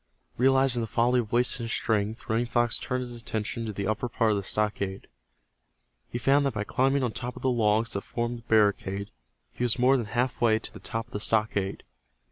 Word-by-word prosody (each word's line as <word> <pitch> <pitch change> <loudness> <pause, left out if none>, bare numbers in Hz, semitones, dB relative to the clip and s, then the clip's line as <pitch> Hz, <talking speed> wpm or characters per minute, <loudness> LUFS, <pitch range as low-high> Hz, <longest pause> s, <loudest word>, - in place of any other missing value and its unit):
Realizing 130 -1 +3
the 115 - -2
folly 120 +2 +2
of 110 -3 -4
wasting 120 0 +2
his 115 - -4
strength, 110 0 -1
Running 115 +2 0
Fox 120 -1 +2
turned 125 0 -2
his 120 -1 -6
attention 115 0 -3
to - - -2
the 100 -1 -4
upper 110 +4 -1
part 115 -2 +1
of 105 - +1
the - - -1
stockade. 100 -1 -2 1.0
He - - -3
found 135 +4 +3
that 130 - -3
by 100 - -1
climbing 135 +5 +1
on 120 - 0
top 125 +1 -4
of - - -10
the 130 - +2
logs 110 -1 +2
that 100 - -2
formed 120 +2 -3
the 115 - -22
barricade 100 -2 +2 0.4
he - - -4
was 120 -1 +1
more 130 +2 +4
than 115 -4 -3
half 125 +3 -1
way 110 -2 +4
to 110 - -6
the - - -10
top 115 0 -3
of - - -21
the 105 - -2
stockade. 105 -2 0
115 Hz, 220 wpm, -27 LUFS, 105-125 Hz, 1.0 s, more